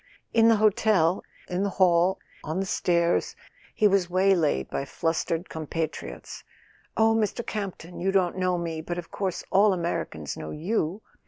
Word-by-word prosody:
In 225 Hz, -1 st, +5 dB
the 230 Hz, -, +6 dB
hotel, 205 Hz, -5 st, +3 dB, 0.2 s
in 180 Hz, +1 st, -2 dB
the 200 Hz, -, +1 dB
hall, 180 Hz, 0 st, +4 dB, 0.3 s
on 155 Hz, +4 st, -3 dB
the 195 Hz, -, -1 dB
stairs, 170 Hz, -2 st, +1 dB, 0.4 s
he 215 Hz, -, +4 dB
was 195 Hz, -3 st, +2 dB
waylaid 180 Hz, -, +2 dB
by -, -, -3 dB
flustered 165 Hz, +4 st, -2 dB
compatriots— 160 Hz, 0 st, -5 dB, 0.5 s
"Oh* 225 Hz, 0 st, +4 dB
Mr. 225 Hz, +1 st, -1 dB
Campton, 190 Hz, -5 st, -5 dB
you 190 Hz, +2 st, +1 dB
don't 185 Hz, -3 st, +2 dB
know 185 Hz, -1 st, 0 dB
me, 165 Hz, -2 st, -3 dB
but 175 Hz, +2 st, -5 dB
of 175 Hz, -1 st, -7 dB
course 190 Hz, -3 st, -3 dB
all 200 Hz, -1 st, +4 dB
Amer¬ 170 Hz, 0 st, -1 dB
icans 75 Hz, -2 st, -7 dB
know 75 Hz, -, -7 dB
you 180 Hz, -, -2 dB
180 Hz, 160 wpm, -26 LUFS, 165-200 Hz, 0.5 s, the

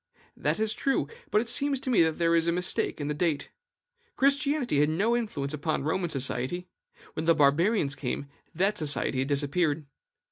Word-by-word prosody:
That -, -, -1 dB
is 220 Hz, 0 st, 0 dB
true; 270 Hz, +4 st, 0 dB, 0.2 s
but 210 Hz, -, +3 dB
it 240 Hz, -, -6 dB
seems 275 Hz, +3 st, +1 dB
to 260 Hz, -, -2 dB
me 230 Hz, -, +5 dB
that 160 Hz, -1 st, +2 dB
there 170 Hz, -1 st, +2 dB
is 165 Hz, 0 st, +2 dB
a -, -, +3 dB
mistake 180 Hz, -1 st, -1 dB
in 145 Hz, -, -3 dB
the 150 Hz, -, -1 dB
date. 155 Hz, -2 st, -1 dB, 0.6 s
Christianity 280 Hz, -, +2 dB
had 150 Hz, +1 st, +3 dB
no 205 Hz, +9 st, +1 dB
influence 155 Hz, -12 st, -2 dB
upon 150 Hz, -1 st, -2 dB
Roman 175 Hz, +3 st, -1 dB
society; 140 Hz, +5 st, -2 dB, 0.5 s
when 160 Hz, -, -4 dB
the 165 Hz, -, +5 dB
Barbarians 150 Hz, +3 st, +3 dB
came, 140 Hz, 0 st, -3 dB, 0.3 s
that 195 Hz, +5 st, +1 dB
society 145 Hz, -3 st, 0 dB
had 135 Hz, -, 0 dB
disappeared. 145 Hz, +2 st, 0 dB
165 Hz, 180 wpm, -28 LUFS, 145-215 Hz, 0.6 s, me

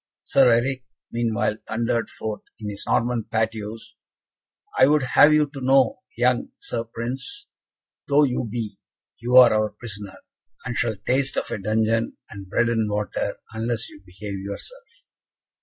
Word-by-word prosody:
Sir 135 Hz, -2 st, +5 dB
Eric, 130 Hz, +3 st, +1 dB, 0.3 s
meanwhile, 115 Hz, -2 st, 0 dB
thundered 115 Hz, +1 st, 0 dB
forth 110 Hz, -1 st, -5 dB, 0.2 s
in 105 Hz, -1 st, -5 dB
his 100 Hz, -, -6 dB
Norman 120 Hz, -1 st, +1 dB
patois, 110 Hz, -1 st, -2 dB, 1.0 s
"I 130 Hz, -, +6 dB
would 150 Hz, -1 st, +3 dB
have 145 Hz, +4 st, +6 dB
you 150 Hz, 0 st, +5 dB
to 135 Hz, -, -7 dB
know, 130 Hz, -1 st, +4 dB, 0.2 s
young 125 Hz, 0 st, +2 dB
Sir, 115 Hz, -1 st, -4 dB
Prince 130 Hz, -, -6 dB, 0.6 s
though 145 Hz, +1 st, +5 dB
you 125 Hz, -3 st, 0 dB
be, 105 Hz, -3 st, -4 dB, 0.4 s
you 125 Hz, +3 st, +3 dB
are 125 Hz, -3 st, +9 dB
our 110 Hz, 0 st, +2 dB
prisoner, 105 Hz, -2 st, -8 dB, 0.5 s
and 125 Hz, -1 st, -3 dB
shall 115 Hz, -2 st, 0 dB
taste 130 Hz, +1 st, +1 dB
of -, -, -2 dB
a -, -, -2 dB
dungeon, 110 Hz, +3 st, 0 dB
and 100 Hz, -2 st, -9 dB
bread 115 Hz, +3 st, +2 dB
and 110 Hz, -2 st, +1 dB
water, 105 Hz, 0 st, -2 dB, 0.2 s
unless 115 Hz, 0 st, -2 dB
you 100 Hz, -, -14 dB
behave 100 Hz, +1 st, -7 dB
yourself." 475 Hz, -, -9 dB
115 Hz, 150 wpm, -24 LUFS, 110-125 Hz, 1.0 s, are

